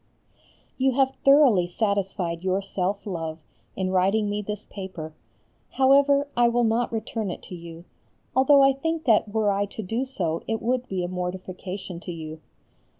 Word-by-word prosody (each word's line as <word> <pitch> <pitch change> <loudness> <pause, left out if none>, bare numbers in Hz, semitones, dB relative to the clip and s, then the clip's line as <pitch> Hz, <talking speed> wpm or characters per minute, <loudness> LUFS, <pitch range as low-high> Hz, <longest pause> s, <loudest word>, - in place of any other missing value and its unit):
You 265 0 +3
have 265 0 +2
thoroughly 275 -11 +6
satisfied 190 -3 -1
your 190 +1 +1
self 195 0 -3
love, 165 -5 -4 0.4
in 185 -1 -1
writing 195 +3 +2
me 205 0 -1
this 210 0 -5
paper. 185 -5 -7 0.6
However, 280 +1 +4
I 240 0 +4
will 240 +1 +2
not 230 +1 +1
return 220 -2 -3
it 175 - -6
to 180 - -8
you, 170 0 -10 0.5
although 275 +2 +6
I 270 0 +5
think 325 +4 -2
that 220 -3 +3
were 215 -1 +2
I 200 +1 0
to 215 +2 -7
do 225 +7 -1
so 175 -11 -2
it 225 0 -1
would 250 +2 -1
be 185 -2 -2
a - - -2
mortification 185 0 -5
to 180 - -7
you. 160 -1 -8
205 Hz, 165 wpm, -25 LUFS, 180-245 Hz, 0.6 s, thoroughly